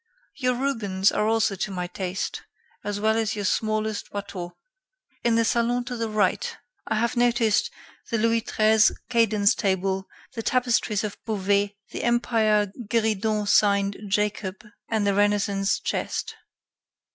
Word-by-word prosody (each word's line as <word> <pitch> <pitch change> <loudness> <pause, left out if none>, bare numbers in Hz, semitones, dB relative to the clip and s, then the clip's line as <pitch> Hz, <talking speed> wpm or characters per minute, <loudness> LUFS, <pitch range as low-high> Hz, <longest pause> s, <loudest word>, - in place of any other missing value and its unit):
Your 250 -3 0
Rubens 210 -8 +1
are 210 - 0
also 225 -2 +2
to 195 - -3
my 180 -2 -3
taste, 185 +1 -4 0.4
as 205 0 -3
well 220 +1 +2
as 225 -1 0
your 205 -1 -3
smallest 215 +1 -1
Watteau. 190 -3 -6 0.7
In 235 -1 +3
the 230 0 +3
salon 240 +2 +1
to 245 0 -5
the 230 -1 -2
right, 215 - 0 0.3
I - - 0
have 235 +3 0
noticed 240 -3 +2 0.4
the 230 - 0
Louis 230 +1 +2
XIII 220 -1 +3 0.2
cadence 215 -4 +3
table, 190 0 -1 0.3
the 230 - -4
tapestries 235 -4 +1
of 210 -2 -6
Beauvais, 205 -1 0 0.2
the - - -4
Empire 220 -4 +2 0.2
gueridon 215 -1 +1
signed 200 -1 +3
'Jacob,' 205 0 -1 0.2
and 220 -2 +1
the 200 - +2
Renaissance 200 -1 +1
chest. - - -3
215 Hz, 140 wpm, -25 LUFS, 200-230 Hz, 0.7 s, In